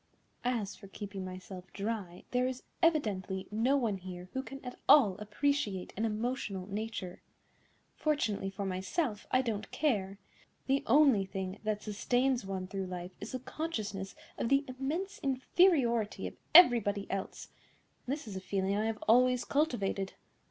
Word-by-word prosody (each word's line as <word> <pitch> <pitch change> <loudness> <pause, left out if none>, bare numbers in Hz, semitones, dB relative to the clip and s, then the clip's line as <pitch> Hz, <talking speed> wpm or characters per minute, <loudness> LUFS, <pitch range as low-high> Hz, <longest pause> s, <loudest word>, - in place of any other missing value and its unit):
As 230 -5 -1
for 200 - -13
keeping 195 -1 -6
myself 185 0 -8
dry, 200 -4 -4
there 250 0 +2
is 255 0 -5 0.2
evidently 200 - +1
no 240 +6 +3
one 225 -7 0
here 180 -1 -8
who 265 - -1
can 275 +1 -9
at 250 - -7
all 220 -11 +7
appreciate 210 -2 -1
an 220 - 0
emotional 215 -3 -2
nature. 205 -2 -5 0.7
Fortunately 220 -11 0
for 195 +1 -4
myself, 205 - -2
I 255 +1 +3
don't 220 -3 -3
care. 200 -10 0 0.5
The 275 +1 +2
only 260 -6 +5
thing 190 0 -5
that 210 -1 -1
sustains 245 +4 +1
one 190 -1 -3
through 190 0 -4
life 180 0 -6
is 210 - -6
the 255 - -2
consciousness 215 -11 -4 0.2
of 230 - 0
the 275 +1 +3
immense 290 +10 -3
inferiority 260 - +2
of - - -4 0.2
everybody 220 - +7
else, 195 -1 -4 0.6
and 260 - +1
this 290 -5 -6
is 200 - -6
a 190 - -4
feeling 195 +1 0
I 210 +1 +1
have 225 -1 -3
always 250 +1 +5
cultivated. 205 -10 0
215 Hz, 150 wpm, -32 LUFS, 195-260 Hz, 0.7 s, all